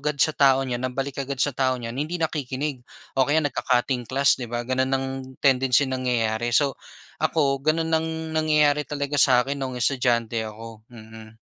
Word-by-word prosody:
agad 150 0 -2
sa 155 - +4
tao 135 -1 +4
niyan, 125 -1 -3
ang 125 - -11
balik 135 0 -3
agad 135 0 -4
sa 145 - +2
tao 130 -1 +2
niyan 115 +1 -6
hindi 155 +4 -2
nakikinig 145 -3 -3 0.4
o 130 - +4
kaya 155 +2 +3
nagka-cutting 125 -3 0
class 140 +1 +3
'di 125 - -4
ba? 120 0 -3
Gano'n 130 +2 0
ang 135 0 0 0.3
tendency, 135 0 +3
nangyayari. 120 -3 -1
So, 140 +3 +2 0.4
ako 135 -3 0
gano'n 160 +1 +1
ang 160 0 -1 0.3
nangyayari 150 -2 +3
talaga 145 0 -3
sa 125 -3 +5
akin 140 +2 -4
noong 130 -2 -4
estudyante 120 -3 +1
ako. 110 0 -10
Mm. 110 -1 -13
130 Hz, 175 wpm, -24 LUFS, 120-145 Hz, 0.4 s, sa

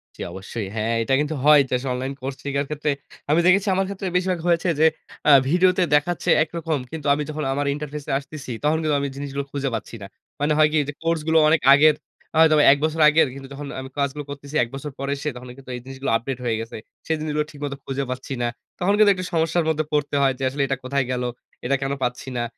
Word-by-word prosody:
জ্বী, - - -10
অবশ্যই। 95 +3 -6
হ্যাঁ, 115 +1 0
এটা 125 - 0
কিন্তু 150 +1 -1
হয় 150 -1 +8
যে, - - -3
আসলে 130 +1 -4
অনলাইন 130 +2 -3
কোর্স 135 0 -4
শিখার 140 0 -1
ক্ষেত্রে 150 0 -1 0.4
আমি 155 - +4
দেখেছি 195 +3 +4
আমার 195 +1 +1
ক্ষেত্রে 195 -1 -4
বেশিরভাগ 180 -1 0
হয়েছে 170 +1 +2
যে, 160 - +5 0.4
আ - - +8 0.2
ভিডিওতে 180 +2 +3
দেখাচ্ছে 165 +4 0
একরকম। 160 -1 -3
কিন্তু 155 -2 -5
আমি 150 +1 -1
যখন 155 0 -4
আমার 145 +1 -1
interface 150 0 -6
এ - - 0
আসতেসি, 140 -2 -8
তখন 150 +2 +2
কিন্তু 155 -2 +1
আমি 140 - -1
জিনিসগুলো 140 0 -4
খুঁজে 140 -1 -2
পাচ্ছি 110 +1 -6
না। 100 - -7 0.3
মানে 150 +1 +2
হয় 155 0 +6
কি? 155 - +1
যে, 145 - -4
কোর্সগুলো 160 -1 +1
অনেক 160 - +3
আগের 150 +1 +6 0.4
আ - - +1
হয়তোবা 155 -2 +6
এক - - -1
বছর 160 +1 -1
আগের, 155 0 +4
কিন্তু 135 0 -9
যখন 145 +1 -7
আমি 130 0 -7
কাজগুলো 140 +1 -1
করতেসি 140 +1 -8
১ 115 - -5
বছর 145 +2 -6
পরে 140 0 -2
এসে, 150 +2 -3
তখন 125 0 -10
কিন্তু 130 -2 -10
এই 125 - -7
জিনিসগুলো 135 -1 -4
আপডেট 125 +2 -5
হয়ে 115 - +1
গেসে। 115 +1 -6 0.3
সে - - -4
জিনিসগুলো 150 -1 -1
ঠিকমত 145 -1 -5
খুঁজে 135 +1 -2
পাচ্ছি 130 +2 -6
না। 120 - +1 0.3
তখন 185 +3 +2
কিন্তু 210 -1 +6
একটা 185 -1 -5
সমস্যার 165 +1 +1
মধ্যে 155 -1 0
পড়তে 145 -1 0
হয় 135 -1 +3
যে, - - -4
আসলে 140 +2 -3
এটা 135 - -1
কোথায় 140 0 0
গেলো, 125 0 -1 0.4
এটা 135 +3 +2
কেন 135 0 -1
পাচ্ছি 125 +1 -3
না? 120 - 0
145 Hz, 230 wpm, -23 LUFS, 135-155 Hz, 0.4 s, হয়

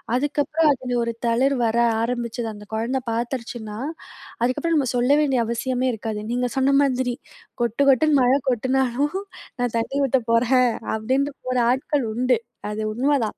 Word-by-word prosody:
அதுக்கப்பறம் 295 +3 +1
அதுல 250 -1 -3
ஒரு 235 0 -2
தளிர் 260 +4 +2
வர 225 +1 0 0.2
ஆரம்பிச்சது 235 -1 -2
அந்த 210 0 -12
குழந்த 240 +4 -1
பாத்துருச்சுனா, 230 -2 -4 0.7
அதுக்கு 255 +1 +1
அப்பறம் 335 -1 +1
நம்ம 270 -4 +1
சொல்ல 250 +3 +2
வேண்டிய 270 -5 +2
அவசியமே 255 +2 -1
இருக்காது. 220 -1 -4
நீங்க 250 0 0
சொன்ன 275 +1 +3
மாதிரி, 255 -2 0 0.5
கொட்டு 235 +3 -1
கொட்டுன்னு 285 +2 +4
மழ 250 +1 +4 0.2
கொட்டுனாலும் 260 - 0 0.4
நான் 245 -2 -1
தண்ணீ 270 +5 -3
ஊத்த 265 0 +2
போறேன் 250 +2 +4 0.3
அப்டிண்ட்டு 265 +6 0
போற 255 0 0
ஆட்கள் 265 +1 0
உண்டு. 250 0 +2 0.3
அது 215 +1 -4
உண்மதான். 255 -1 0
250 Hz, 150 wpm, -23 LUFS, 235-270 Hz, 0.7 s, கொட்டுன்னு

